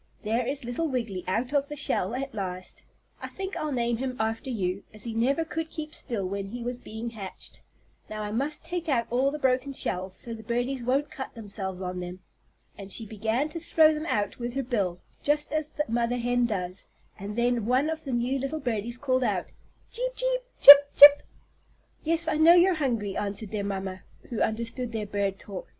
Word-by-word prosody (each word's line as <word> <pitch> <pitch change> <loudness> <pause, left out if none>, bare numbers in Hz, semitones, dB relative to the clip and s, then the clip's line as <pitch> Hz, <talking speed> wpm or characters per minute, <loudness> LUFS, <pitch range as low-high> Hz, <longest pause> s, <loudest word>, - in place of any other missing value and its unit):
There 230 +3 0
is 275 0 -2
little 245 +8 -2
Wiggily 230 - -3
out 240 +8 -1
of 285 -1 +1
the 295 - -5
shell 240 -7 0
at 270 +1 -4
last. 185 -3 -5 0.4
I - - -4
think 390 0 -6
I'll 305 -1 -3
name 240 -2 0
him 255 +1 -3
after 225 +4 -2
you, 195 -5 -2
as 215 - -10
he 230 - -4
never 270 +8 +1
could 320 0 -4
keep 305 -1 -7
still 215 -8 -3
when 195 +1 -4
he 235 +4 -6
was 245 +1 -4
being 230 0 -6
hatched. 200 -4 -8 0.5
Now 215 0 -5
I 210 - -4
must 285 +8 -2
take 345 -1 -3
out 235 -5 +2
all 260 +3 +2
the 295 - -4
broken 265 0 0
shells 185 -6 -2
so 235 - -6
the 225 - -8
birdies 245 +4 -2
won't 265 +4 0
cut 265 - -7
themselves 195 -4 -5
on 180 0 -4
them." 180 +1 -7 0.6
And 195 -1 -9
she 225 - 0
began 220 +6 -1
to 335 - -6
throw 315 -1 +4
them 305 +2 -4
out 205 - -1
with 240 +1 -4
her 275 - -1
bill, 200 -8 -1 0.2
just 295 0 0
as 310 -1 -1
the 300 - -2
mother 235 +1 0
hen 245 0 +1
does, 185 -3 -4 0.3
and 200 +2 -6
then 240 -2 +1
one 255 +4 +2
of 320 0 -3
the 275 - -5
new 245 +3 0
little 275 +4 -3
birdies 235 -2 -3
called 255 -1 0
out: - - -1 0.4
"Cheep - - -2
cheep - - 0 0.2
chip 285 0 +11
chip!" 285 0 +10 0.8
"Yes, 330 +1 +2
I 320 - +1
know 320 +2 +7
you're 355 +2 +5
hungry," 235 - -1
answered 205 0 -3
their 210 -2 -2
mamma, 190 -2 -4 0.3
who 235 - -2
understood 230 +2 -2
their 215 -2 -2
bird 200 -1 -2
talk. 195 -2 -8
240 Hz, 205 wpm, -27 LUFS, 210-285 Hz, 0.8 s, chip